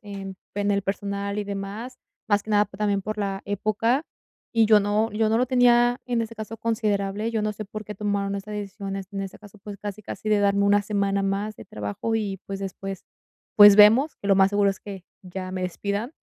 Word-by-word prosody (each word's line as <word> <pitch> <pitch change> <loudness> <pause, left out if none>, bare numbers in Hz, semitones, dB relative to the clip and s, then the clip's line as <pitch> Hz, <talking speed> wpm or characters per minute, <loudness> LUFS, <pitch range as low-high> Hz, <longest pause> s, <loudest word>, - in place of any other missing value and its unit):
en 195 -2 -8 0.2
en 205 0 0
el 200 0 +2
personal 200 +1 -3
y 210 - -2
demás, 205 +5 -6 0.3
más 205 0 +3
que - - -17
nada 210 0 +4
también 200 0 -1
por 215 +2 -4
la 195 -1 -2
época. 215 - 0 0.5
Y 225 -1 +5
yo 215 -1 +6
no 210 +2 0
yo 215 0 +1
no 220 - +2
lo 245 - +3
tenía 245 -1 +4
en 240 -2 0
ese 230 0 -6
caso 220 +1 -7
considerable. 210 -1 -1
Yo 220 -2 -1
no 210 0 0
sé 210 0 -7
por 215 +1 -7
qué 210 - -7
tomaron 200 -1 -1
estas 210 +2 -7
decisiones, 195 -1 -5
en 195 - -3
este 195 0 -7
caso, 210 0 -15
pues, 205 +1 -9
casi, 205 +1 -6
casi 215 +1 -5
de 210 - +4
darme 200 0 +3
1 205 0 +4
semana 200 -1 0
más 200 +2 -2
de - - -12
trabajo 105 - -4
y, 205 -3 -2
pues, 195 0 -5
después, 195 0 -6 0.5
pues, 205 -1 +9
vemos, 225 +9 +6
que 200 - -6
lo 195 - +6
más 190 0 +5
seguro 205 0 +2
es 195 - -7
que 195 -3 -9 0.2
ya 185 0 -6
me 185 0 -4
despidan. 200 - -3
205 Hz, 220 wpm, -25 LUFS, 195-215 Hz, 0.5 s, pues